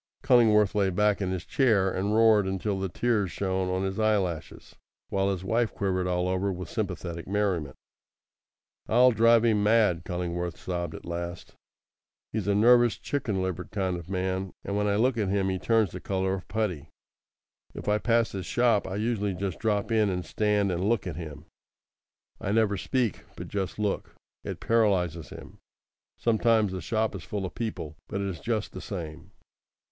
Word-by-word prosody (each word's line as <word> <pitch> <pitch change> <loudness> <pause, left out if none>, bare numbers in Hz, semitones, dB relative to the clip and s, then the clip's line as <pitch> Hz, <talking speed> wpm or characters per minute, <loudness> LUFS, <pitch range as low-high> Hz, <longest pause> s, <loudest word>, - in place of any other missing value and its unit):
Cullingworth 110 -6 +5
lay 100 -2 +2
back 105 +3 +2
in 95 - -1
his 95 -2 -3
chair 110 -9 +2
and 100 +4 -1
roared 110 -3 +5
until 95 +1 -2
the 95 0 -2
tears 105 -2 0
shone 95 -1 -1
on 95 +1 -1
his 95 +2 -2
eyelashes, 100 -7 -1 0.3
while 95 0 +1
his 95 -2 -2
wife 115 +3 0
quivered 95 -2 0
all 90 0 0
over 95 +2 0
with 90 0 -6
sympathetic 90 -5 -4
merriment. 95 -8 -1 1.1
"I'll 125 +3 +5
drive 115 0 +5
him 110 -3 +3
mad," 105 -5 +3
Cullingworth 90 -1 -3
sobbed 85 -1 -4
at - - -10
last. 85 0 -5 0.8
"He's 110 -2 -2
a 100 - +2
nervous, 120 +1 +5
chicken 110 -9 -2
livered 90 0 -4
kind 95 -3 -1
of 85 0 -8
man; 95 0 -2
and 100 - -3
when 105 0 +1
I 100 - +2
look 120 +2 +2
at 100 -3 0
him 95 -1 +1
he 95 0 -1
turns 110 -3 +2
the 90 - -6
colour 95 0 -1
of 95 -1 -5
putty. 90 -9 -2 0.9
If - - -8
I 105 0 +2
pass 115 0 +2
his 95 -4 -5
shop 120 -4 +2
I 95 - -4
usually 105 -2 -1
just 95 -2 -4
drop 105 0 0
in 110 -2 +3
and 90 -1 -2
stand 105 -2 +1
and 90 +1 -1
look 110 0 +1
at 90 -5 -4
him. 75 -2 -8 0.9
I 100 - -2
never 110 -1 +2
speak, 120 +2 -1
but - - -8
just 95 -2 -3
look. 105 -2 -2 0.3
It - - -5
paralyses 90 -8 +1
him. - - -11 0.6
Sometimes 110 -2 +2
the 95 -1 -4
shop 110 +4 0
is 100 - -6
full 100 +4 -4
of 90 - -6
people; 95 -9 -5
but 100 - -3
it 100 - -2
is 95 -4 -4
just 110 -2 -2
the - - -8
same." 85 -4 -7
100 Hz, 180 wpm, -27 LUFS, 90-110 Hz, 1.1 s, Cullingworth